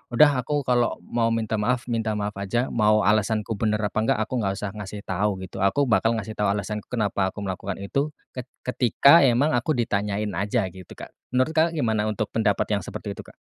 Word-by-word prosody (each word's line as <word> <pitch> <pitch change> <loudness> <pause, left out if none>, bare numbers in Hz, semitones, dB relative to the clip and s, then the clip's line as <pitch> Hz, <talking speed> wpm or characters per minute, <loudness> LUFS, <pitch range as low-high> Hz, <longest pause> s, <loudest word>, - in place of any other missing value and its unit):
udah 150 +1 +7
aku 145 +2 -1
kalau 120 -2 +1
mau 115 -1 0
minta 110 -1 -1
maaf, 120 +3 0
minta 115 -2 -1
maaf 105 0 -2
aja, 120 +6 -1
mau 105 -1 +3
alasanku 110 +1 +1
bener 110 -1 +1
apa 105 +1 -1
enggak, 110 - +2
aku 110 - -8
gak 95 0 0
usah 100 -2 -4
ngasih 105 0 -7
tahu 95 +1 0
gitu 95 +1 -8
aku 120 +9 +3
bakal 115 0 +2
ngasih 110 0 -5
tahu 105 - +1
alasanku 105 +1 -4
kenapa 100 -5 0
aku 105 - -8
melakukan 95 0 -4
itu 140 +9 -1 0.2
ket 125 -2 -5 0.2
ketika 135 +6 +5
emang 135 +4 +3
aku 130 +6 0
ditanyain 105 -3 -1
aja 100 +3 0
gitu, 95 -1 -13
Kak, - - -10 0.2
menurut, 130 +4 +2
Kakak, 165 +1 +3
gimana 110 -7 0
untuk 105 - -2
pendapat - - +1
yang - - -3
seperti - - -6
itu, - - -9
Kak? - - -16
110 Hz, 205 wpm, -24 LUFS, 105-120 Hz, 0.2 s, udah